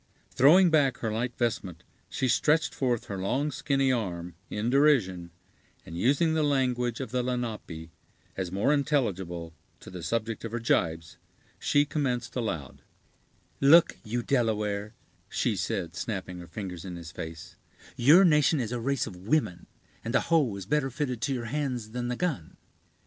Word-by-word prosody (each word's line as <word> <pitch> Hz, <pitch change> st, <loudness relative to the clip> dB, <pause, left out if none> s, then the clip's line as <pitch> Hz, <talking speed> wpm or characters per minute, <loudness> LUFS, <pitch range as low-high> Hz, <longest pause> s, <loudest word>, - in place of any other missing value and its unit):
Throwing 170 Hz, +6 st, +6 dB
back 140 Hz, -5 st, +3 dB
her 110 Hz, -, -3 dB
light 120 Hz, +2 st, -2 dB
vestment, 95 Hz, -8 st, -2 dB, 0.3 s
she 130 Hz, -, -1 dB
stretched 150 Hz, +5 st, +2 dB
forth 125 Hz, -4 st, -1 dB
her 100 Hz, -2 st, -5 dB
long, 130 Hz, +10 st, 0 dB
skinny 135 Hz, -1 st, +1 dB
arm, 90 Hz, -8 st, -3 dB, 0.2 s
in 110 Hz, +3 st, -2 dB
derision, 115 Hz, -, +3 dB, 0.6 s
and 80 Hz, -, -9 dB
using 140 Hz, -, +2 dB
the 160 Hz, -, +1 dB
language 125 Hz, -5 st, 0 dB
of -, -, -5 dB
the 125 Hz, 0 st, 0 dB
Lenape, 110 Hz, -10 st, -4 dB, 0.4 s
as 95 Hz, -2 st, -3 dB
more 100 Hz, +10 st, +2 dB
intelligible 95 Hz, -, -1 dB, 0.3 s
to -, -, -12 dB
the 90 Hz, -1 st, -7 dB
subject 115 Hz, +5 st, -2 dB
of 115 Hz, -1 st, -6 dB
her 120 Hz, -, -1 dB
gibes, 80 Hz, -7 st, 0 dB, 0.4 s
she 145 Hz, 0 st, +3 dB
commenced 125 Hz, -5 st, -2 dB
aloud: 85 Hz, -, -4 dB, 0.8 s
"Look 160 Hz, +5 st, +6 dB
you, 120 Hz, +2 st, -3 dB
Delaware," 105 Hz, -4 st, -1 dB, 0.3 s
she -, -, 0 dB
said, 85 Hz, -, -3 dB
snapping 95 Hz, -4 st, -4 dB
her 85 Hz, -, -10 dB
fingers 90 Hz, -5 st, -6 dB
in 90 Hz, -2 st, -6 dB
his 85 Hz, -1 st, -9 dB
face; 80 Hz, -1 st, -8 dB, 0.4 s
"your 155 Hz, +10 st, +6 dB
nation 150 Hz, -2 st, +4 dB
is 115 Hz, -3 st, -2 dB
a 125 Hz, -, -2 dB
race 135 Hz, +2 st, 0 dB
of -, -, -8 dB
women, 110 Hz, -, 0 dB, 0.4 s
and 115 Hz, +3 st, -3 dB
the -, -, +4 dB
hoe 150 Hz, -11 st, +2 dB
is 100 Hz, -2 st, -7 dB
better 150 Hz, +4 st, +1 dB
fitted 130 Hz, -3 st, -3 dB
to 140 Hz, -, 0 dB
your 120 Hz, -2 st, -4 dB
hands 125 Hz, -4 st, -3 dB
than 120 Hz, +1 st, -3 dB
the 125 Hz, -, -2 dB
gun. 145 Hz, -, -3 dB
120 Hz, 165 wpm, -28 LUFS, 95-140 Hz, 0.8 s, Throwing